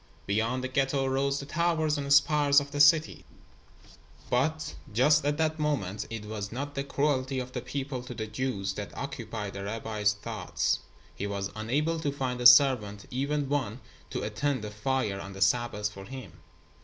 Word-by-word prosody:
Beyond 115 +5 0
the - - -1
Ghetto 135 +1 +1
rose 135 +1 0
the 140 - -6
towers 160 0 +1
and 140 -1 -3
spires 145 0 +5
of 140 0 -7
the 145 - -3
city, 155 +2 +5 1.1
but 150 +5 0 0.2
just 150 +8 +4
at 145 0 +1
that 160 0 0
moment 105 -10 -1
it 115 -2 -6
was 105 -1 -5
not 140 +4 -4
the 140 - -2
cruelty 140 -2 0
of 125 0 -4
the 125 - -4
people 130 +1 -4
to 125 - -7
the 110 - -3
Jews 105 -4 -2
that 100 +1 -7
occupied 115 -7 -5
the 100 - -6
rabbi's 105 0 0
thoughts. 105 - -2 0.3
He 100 - -4
was 100 -1 -3
unable 145 +10 0
to 145 -3 -1
find 130 -3 -3
a 120 - +10
servant, 125 -6 +5
even 140 +3 -1
one 130 -5 -1 0.3
to - - -3
attend 115 +4 -1
the 105 - -5
fire 105 -2 -1
on 100 0 -7
the 95 - -9
Sabbath 105 0 +1
for 100 -1 -10
him. 130 -6 -9
130 Hz, 180 wpm, -29 LUFS, 105-145 Hz, 1.1 s, a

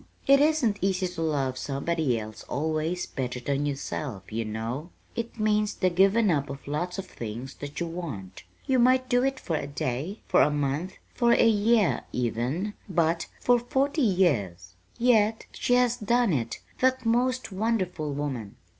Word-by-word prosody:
It 275 0 +6
isn't 285 -9 +2
easy 190 -1 +1
to 175 -2 -6
love 135 -5 0
somebody 140 -2 0
else 110 -1 -8
always 155 +4 -1
better 125 -2 -4
than 140 +3 -1
yourself, 135 -7 -4
you 115 +1 -1
know! 115 +9 -4 0.3
It 230 0 -5
means 210 -1 +1
the 185 -1 +1
giving 195 +3 +4
up 140 -3 0
of 140 0 -8
lots 175 +6 -2
of 195 - -4
things 120 -3 -7
that 145 0 -6
you 170 - -1
want. 145 - -6 0.2
You 265 -2 +2
might 255 +1 +4
do 245 0 +3
it 270 0 0
for 165 - -2
a 140 - -4
day, 140 - -3
for - - +4
a - - +5
month, 145 +5 -1 0.2
for 235 -1 +3
a 235 - +5
year 215 -2 +3
even 125 - -1 0.2
but 165 -1 +1
for 245 0 +4
forty 275 +5 0
years! 110 - +1 0.2
Yet 225 -3 +3
she 245 - +1
has 245 -1 +3
done 235 -2 +2
it 115 -5 -2 0.2
that 260 -1 +2
most 250 +1 +1
wonderful 185 -7 -1
woman. 135 -8 -4
170 Hz, 165 wpm, -27 LUFS, 140-225 Hz, 0.3 s, It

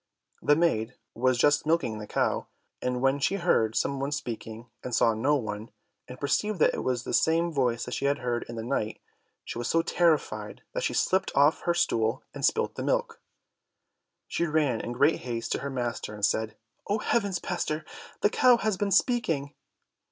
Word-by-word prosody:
The 145 - +4
maid 125 -8 +1 0.2
was 130 +1 +2
just 145 +4 +3
milking 155 -10 +1
the 105 - -7
cow, - - 0 0.3
and 125 0 -1
when 135 +1 +3
she 190 - +1
heard 140 - +2
some 140 -1 0
one 140 +1 -2
speaking, 120 -4 -5 0.2
and 125 -2 -2
saw 115 - +4
no 135 +7 +2
one, 110 -4 -4 0.4
and 125 0 -10
perceived 210 +9 0
that 155 - +4
it - - -3
was 125 -1 -1
the - - -5
same 165 +1 +2
voice 125 -5 +1
that - - -6
she - - -2
had 140 +1 +2
heard 120 -2 -2
in 120 - -6
the 115 - -4
night, 110 -3 -2 0.5
she - - -5
was 120 - -2
so 165 0 +2
terrified 170 -3 0
that - - -2
she - - -1
slipped 190 0 +1
off 145 +3 +4
her 175 - +2
stool, 110 -8 +1
and - - -7
spilt - - +2
the - - -6
milk. - - -1 1.1
She 170 - -1
ran 150 -7 +1
in 120 - -4
great 140 +6 +3
haste 115 -2 -4
to - - 0
her 140 - -4
master, 120 -4 -3
and 105 -1 +1
said, 110 0 -1 0.3
"Oh 205 - +2
heavens, 200 -4 0
pastor, 160 -4 -3 0.4
the 205 - +3
cow 250 -1 +5
has 215 -4 -1
been 205 +1 0
speaking!" 165 - +1
140 Hz, 195 wpm, -28 LUFS, 120-165 Hz, 1.1 s, cow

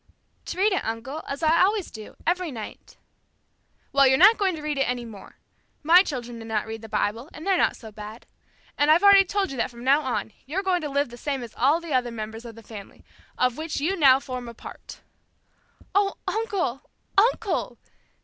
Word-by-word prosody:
"To - - -6
read 400 +2 +3
it, 375 - -1
uncle, 240 +8 -5
as 280 +3 -5
I 320 +1 +4
always 400 0 +1
do, 215 -1 -10
every 360 0 0
night." 225 -4 -9 1.0
"Well, 275 -1 +6
you're 265 0 +4
not 420 +7 +7
going 380 -3 +1
to 310 - -8
read 300 -2 -2
it 270 - +1
any 245 -1 -2
more! 215 -4 -12 0.5
My 340 +4 +7
children 245 -9 -5
do 225 - -9
not 220 -2 -1
read 225 0 -7
the 225 - -10
Bible 220 +5 -2
and 310 - -9
they're 390 -1 +3
not - - +2
so 220 -2 -11
bad. 210 +2 -10 0.5
And 290 +1 +3
I've 325 +5 +5
already 400 -1 +8
told 390 -1 -1
you 270 - -6
that 235 - 0
from 240 -1 -12
now 275 +4 +4
on, 250 -5 -3
you're 360 +8 -2
going 365 -2 +1
to 300 - -4
live 280 -1 0
the 240 - -11
same 275 0 -3
as 230 - -10
all 285 +6 +3
the 335 -3 -6
other 250 -2 +1
members 225 0 -7
of 230 -2 -9
my 230 - -13
family, 205 -2 -12 0.3
of 250 -1 +1
which 315 -1 -3
you 335 +7 0
now 270 -6 +6
form 250 -3 -6
a 235 - -11
part!" - - -11 0.9
"Oh, 400 0 +2
uncle, 395 - -2 0.3
uncle!" 440 0 +1
275 Hz, 210 wpm, -25 LUFS, 235-355 Hz, 1.0 s, already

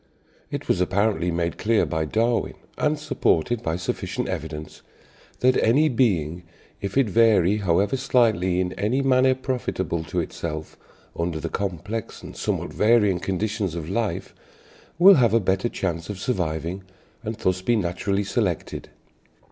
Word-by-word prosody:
It - - -5
was 90 - +1
apparently 100 -1 +1
made 85 0 -2
clear 110 0 +2
by 80 0 -1
Darwin, 115 +8 0 0.2
and 150 0 +1
supported 120 - 0
by 80 - -1
sufficient 90 +1 -3
evidence, 80 -4 -6 0.6
that 130 0 +4
"any 145 +8 +4
being, 90 - +1 0.4
if 100 +4 -3
it 135 -4 +4
vary 105 -2 +4
however 100 +4 +1
slightly, 110 -9 +2
in 90 -1 -1
any 120 +7 0
manner 130 0 +4
profitable 120 - -2
to 90 +1 -2
itself, 80 -1 -5 0.4
under 85 -1 -2
the 80 - -4
complex 100 +4 -4
and - - -9
somewhat - - -2
varying 105 -4 +3
conditions 95 -1 -2
of 85 +1 -5
life, 115 0 -2 0.6
will 185 +2 +8
have 115 -2 +4
a - - +5
better 95 +3 0
chance 85 -4 -3
of 105 - -4
surviving, 90 -4 -2 0.4
and 110 0 -3
thus 95 -3 0
be 120 +5 +2
naturally 100 +1 -1
selected." 100 -5 -2
100 Hz, 145 wpm, -24 LUFS, 85-115 Hz, 0.6 s, will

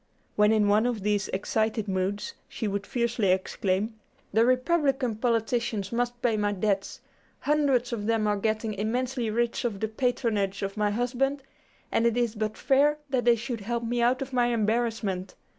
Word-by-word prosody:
When 210 +1 +4
in 215 -2 +3
one 210 +3 +4
of 230 -5 -2
these 205 0 +1
excited 220 +2 -1
moods, 195 - -2 0.2
she 225 - -3
would 200 0 -3
fiercely 235 -3 0
exclaim 190 +3 0 0.3
"The 220 +2 +5
Republican 255 -2 +1
politicians 230 -3 0
must 240 +1 -1
pay 230 -3 +2
my 205 -1 +1
debts. 200 0 -1 0.4
Hundreds 275 -5 +2
of 210 -2 -3
them 225 -1 +2
are 210 0 +2
getting 215 +1 -1
immensely 240 +3 -1
rich 235 +2 0
off 225 -5 -2
the 220 - 0
patronage 220 -4 -1
of 195 0 -3
my 210 -1 +1
husband, 255 +5 -1 0.5
and 230 - +3
it 235 0 0
is 240 -3 +1
but 215 -1 -3
fair 290 +2 +3
that 255 -3 +1
they 240 -1 +6
should 230 0 -5
help 235 +3 -2
me 240 +1 -1
out 250 +3 +2
of 270 0 -11
my 245 -1 +3
embarrassment. 220 -4 -1
225 Hz, 175 wpm, -27 LUFS, 210-245 Hz, 0.5 s, they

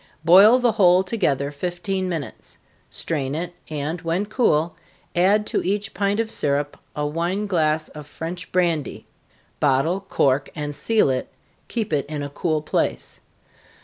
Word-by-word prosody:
Boil 195 +8 +8
the 245 -2 +2
whole 185 -4 +5
together 145 - 0
fifteen 180 +5 -3
minutes 160 -6 -6 0.3
strain 140 -4 -2
it, 175 +2 -4 0.2
and 155 +3 -3
when 170 +5 -1
cool, 175 - +1 0.4
add 200 +4 +3
to - - -1
each 205 +2 -1
pint 200 +2 0
of 225 -1 -1
syrup 145 0 0 0.2
a 150 - -1
wine 170 +7 -1
glass 155 -5 +1
of 150 -1 -10
French 175 +4 -6
brandy. 170 -6 0 0.5
Bottle, 145 +6 +2
cork, 140 -7 +1
and 150 -1 -4
seal 220 -1 +2
it 130 -1 -3 0.4
keep 220 -8 -3
it 140 -1 0
in 150 -1 -4
a 145 - -4
cool 155 0 -1
place. 60 - -2
170 Hz, 145 wpm, -22 LUFS, 145-195 Hz, 0.5 s, Boil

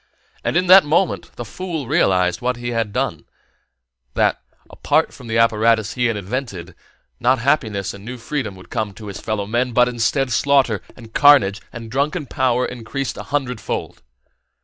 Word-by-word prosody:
And - - 0
in 180 - +2
that 185 +2 +8
moment 165 +5 0
the 120 - -6
fool 165 - -5
realized 90 - +2
what 125 +1 0
he 120 0 -4
had 115 -3 -1
done: - - -2 0.9
that, - - +2 0.7
from 125 - -12
the 115 0 -1
apparatus 115 -1 +3
he 125 -1 +1
had 115 -2 -1
invented, 100 -4 -5 0.5
not 130 +2 +3
happiness 115 -7 0
and 100 0 -11
new 125 +3 -7
freedom 120 -4 -4
would 95 - -15
come 105 -3 -3
to 110 - -10
his 100 - -7
fellow 110 -3 -2
men, 120 +4 -1
but 125 +1 +4
instead 125 +2 0
slaughter 135 -7 +2
and 115 -2 -14
carnage 125 -9 +5
and 115 -2 -9
drunken 145 +5 -1
power 125 -1 +1
increased 125 +1 -4
a - - -6
hundredfold. 130 -6 -3
120 Hz, 165 wpm, -20 LUFS, 110-135 Hz, 0.9 s, that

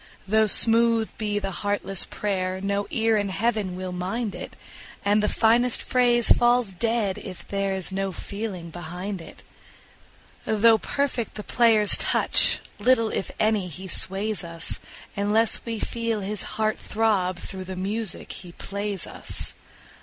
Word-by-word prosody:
Though 220 +2 +3
smooth 230 +1 +6
be 210 -1 -1
the 195 -1 -3
heartless 195 0 -1
prayer, 185 -2 -2
no 200 +1 -2
ear 225 -1 +1
in 205 -1 -1
Heaven 210 -2 -1
will 185 0 -5
mind 195 +5 -3
it, - - -8 0.5
And 205 +1 +3
the 210 - +1
finest 235 +2 +3
phrase 240 -2 +2
falls 240 -4 +2
dead 225 -1 -1
if 175 -2 -9
there 195 -1 -1
is 190 0 -4
no 195 0 -2
feeling 190 -3 -6
behind 180 +3 -6
it. - - -13 1.0
Though 220 +1 +4
perfect 270 -3 -2
the 210 - -6
player's 225 -4 +4
touch, - - +3 0.2
little, 230 0 +3
if - - -3
any, 215 -3 +1
he 185 +3 -9
sways 195 +3 0
us, 165 -1 -1 0.4
Unless 210 +3 +1
we 230 -1 -3
feel 230 -2 -2
his 205 +1 -5
heart 215 0 0
throb 200 -5 0
through 185 +1 -8
the 190 0 -6
music 200 +2 -3
he 175 -2 -9
plays 200 0 -4
us. - - -6
205 Hz, 145 wpm, -24 LUFS, 190-225 Hz, 1.0 s, smooth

